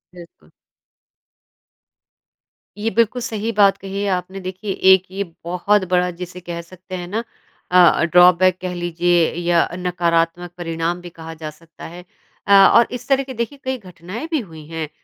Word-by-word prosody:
बिल्कुल। 170 -1 -15 2.3
ये 215 +2 -1
बिल्कुल 230 +2 +1
सही 225 -2 -3
बात 200 -1 +5
कही 195 0 -6
है - - -1
आपने 185 +1 -3
देखिए, 185 +2 -5
एक 190 -1 +5
ये 200 +1 -2 0.2
बहुत 180 +4 +1
बड़ा 180 0 +2
जिसे 180 0 -7
कह 170 -1 -6
सकते 185 +2 -11
हैं 175 -1 -6
ना 220 +5 -3 0.5
अ, 180 -2 +5
ड्रॉबैक 180 +2 +5
कह 180 -1 -4
लीजिए 175 -1 +1
या 170 -1 +2
नकारात्मक 175 -1 0
परिणाम 165 0 -3
भी 175 - -9
कहा 165 -1 -10
जा 155 -1 -7
सकता 165 +2 -14
है। 175 +2 -11 0.4
अ, 200 - +4
और 200 +4 +7
इस 245 - -7
तरह 275 0 +2
के 265 - -8
देखिए 235 +4 -4
कई 260 0 -2
घटनाएँ 185 - -8
भी 315 - +1
हुई 160 - -10
हैं 160 -2 -5
180 Hz, 165 wpm, -20 LUFS, 170-200 Hz, 2.3 s, और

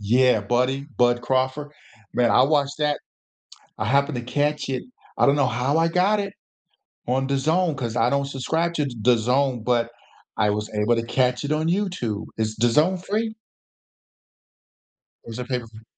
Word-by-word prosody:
Yeah, 120 +2 +3
Buddy 125 +6 0
Bud 120 0 +3
Crawford. 130 +3 0 0.5
Man, 120 -1 +3
I 125 - +5
watched 145 0 +1
that 150 -1 +1 0.8
I - - -2
happened 140 +4 +2
to 120 - -4
catch 145 +3 -1
it, 130 - -2 0.3
I - - +4
don't 140 0 +4
know 140 -3 +2
how 125 +5 0
I 165 0 +3
got 185 +5 +2
it 200 -1 -4 0.7
on 130 +2 0
DAZN 155 +5 +1
'cause 120 -3 -3
I 120 +1 +3
don't 140 +1 0
subscribe 160 +5 -1
to 150 -3 0
DAZN, 125 +1 +1
but 120 -1 +1 0.5
I 105 - +2
was 105 +1 -3
able 105 +3 +2
to 115 - -1
catch 125 +2 +1
it 145 - -3
on 155 +1 0
YouTube. 175 - -1
Is 110 -1 -1
DAZN 150 +11 +3
free? 220 +2 -2 1.9
Or 115 - -10
is 115 - -7
it 125 - -5
pay-per-view? 115 -4 -5
130 Hz, 165 wpm, -23 LUFS, 120-150 Hz, 1.9 s, I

